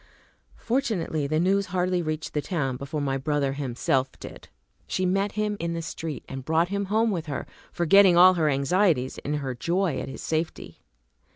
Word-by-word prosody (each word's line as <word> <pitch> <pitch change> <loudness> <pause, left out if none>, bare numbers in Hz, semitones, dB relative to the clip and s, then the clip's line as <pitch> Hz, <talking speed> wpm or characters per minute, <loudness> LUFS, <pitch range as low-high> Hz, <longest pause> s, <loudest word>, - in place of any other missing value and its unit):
Fortunately, 215 - -1
the 155 +2 0
news 195 +3 +2
hardly 180 0 0
reached 155 -1 -4
the 150 - 0
town 140 -6 -2
before 140 +3 -4
my 135 -1 0
brother 140 -1 0
himself 135 -1 0
did. - - -10 0.4
She 185 - -1
met 195 +2 0
him 210 0 -1
in 170 0 -2
the 165 - -3
street, 160 -1 -6
and 135 -1 -6
brought 160 +4 +1
him 200 0 -1
home 220 +3 +1
with 170 -4 -3
her, 145 - -4 0.3
forgetting 180 +1 +5
all 185 +1 +8
her 160 -4 +1
anxieties 140 -1 +1
in 150 - -3
her 135 -3 -3
joy 170 +4 -1
at - - -5
his 135 - -8
safety. 160 +1 -3
165 Hz, 180 wpm, -26 LUFS, 140-185 Hz, 0.4 s, all